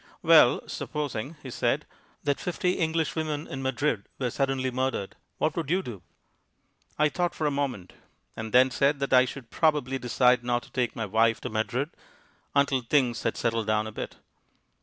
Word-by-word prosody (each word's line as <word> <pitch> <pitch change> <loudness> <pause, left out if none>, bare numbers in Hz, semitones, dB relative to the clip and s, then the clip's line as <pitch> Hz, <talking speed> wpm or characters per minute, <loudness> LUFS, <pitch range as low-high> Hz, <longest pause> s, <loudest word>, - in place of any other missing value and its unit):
"Well, - - +6
supposing," 145 -1 -4
he 130 - -7
said, - - 0 0.4
"that 145 -1 0
fifty 180 0 0
English 160 -3 0
women 155 -1 -2
in 135 - -6
Madrid 130 -4 0
were 125 -3 -1
suddenly 135 -1 0
murdered, 130 -6 -2 0.2
what 155 0 0
would 165 -5 -3
you 185 +3 +1
do?" 110 -7 -7 1.0
I 150 - +4
thought 175 +2 -1
for 155 - -2
a 150 - +2
moment, 135 -10 -3 0.4
and 110 0 -5
then 130 +2 +5
said 140 +2 +2
that 140 -1 -1
I 130 0 +7
should 125 -2 -8
probably 145 -5 +1
decide 125 0 +3
not 120 0 0
to - - -17
take 125 -2 -1
my 115 - -2
wife 110 +2 +2
to - - -4
Madrid 120 +7 -1 0.6
until 140 -2 +3
things 120 -1 +1
had - - -1
settled 115 -2 0
down 110 0 +2
a 110 - -6
bit. - - -6
130 Hz, 180 wpm, -27 LUFS, 120-150 Hz, 1.0 s, I